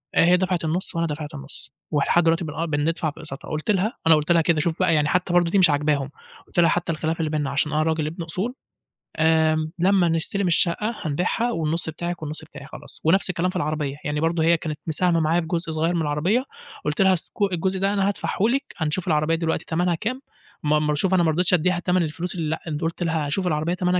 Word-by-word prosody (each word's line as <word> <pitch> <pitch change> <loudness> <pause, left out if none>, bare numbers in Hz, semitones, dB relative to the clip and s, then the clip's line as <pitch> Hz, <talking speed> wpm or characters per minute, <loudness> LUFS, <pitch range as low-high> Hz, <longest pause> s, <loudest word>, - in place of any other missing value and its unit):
آآ - - +5
هي 180 +1 +5
دفعت 180 -2 -1
النُصّ 170 +3 -2
وأنا 165 0 0
دفعت 150 0 -5
النُصّ، 140 -1 -9 0.2
ولحد 155 +3 +2
دلوقتي 165 +2 +2
بن 150 - -6
آه 165 +2 -2
بندفع 155 +1 -1
في 145 - -16
اقساطها 145 -4 -7
قُلت 155 +6 -1
لها 205 +4 0
أنا 160 - +8
قُلت 150 +3 0
لها 170 -1 +5
كده 160 -1 +2
شوف 165 +1 -2
بقى 185 -3 +3
يعني 150 -1 +2
حتى 180 +2 0
برضه 175 -1 +3
دي 200 - +3
مش 180 -4 +6
عاجباهم 145 -2 +1 0.4
قلت - - -2
لها 170 -1 +5
حتى 175 -1 0
الخِلاف 160 +1 -2
اللي 160 -1 0
بيننا 150 -3 -1
علشان 150 +1 0
أنا 155 +1 +2
راجل 160 -1 0
ابن 170 +3 -5
أصول، 185 +9 -3 0.6
آآ، 160 0 +2
لمّا 185 0 +3
نستلم 165 +4 0
الشقة 180 +6 +1
هنبيعها 180 +10 -1
والنُصّ 165 -3 -1
بتاعك 170 +2 -5
والنُصّ 155 +1 -4
بتاعي 150 -2 -11
خلاص، 155 - -11
ونفس 190 +5 +4
الكلام 180 +1 0
في 185 - -7
العربية، 150 -4 -2
يعني 150 0 -2
برضه 165 +1 +1
هي 165 +1 +4
كانت 155 -2 -5
مساهمة 170 +2 +1
معايا 160 +2 +2
بجزء 165 0 -2
صغير 160 +2 0
من 170 - 0
العربية، 160 +11 +1 0.4
قُلت 150 +3 0
لها 190 -1 +5
الس 175 - -1
ك 200 -2 -1
الجزء 185 +2 -1
ده 195 +1 +1
أنا 195 -1 +1
هادفعه 200 - -2
لِك، 250 +6 +2
هنشوف 165 +2 -2
العربية 155 0 +2
دلوقتي 165 0 -2
تمنها 175 +1 0
كام 250 +10 -4 0.4
ما 150 0 +3
ما 150 0 0
شوف 190 +5 0
أنا 180 -2 +4
مرضيتش 170 +3 +2
أدّيها 180 +1 +2
تمن 180 0 +1
الفلوس 170 +4 -3
اللي 160 -3 -2 0.2
لأ 155 -2 -2
قُلت 165 +2 -2
لها 160 -2 0
هاشوف 180 +6 -1
العربية 155 +1 0
تمنها 180 0 +1
165 Hz, 230 wpm, -23 LUFS, 155-180 Hz, 0.6 s, أنا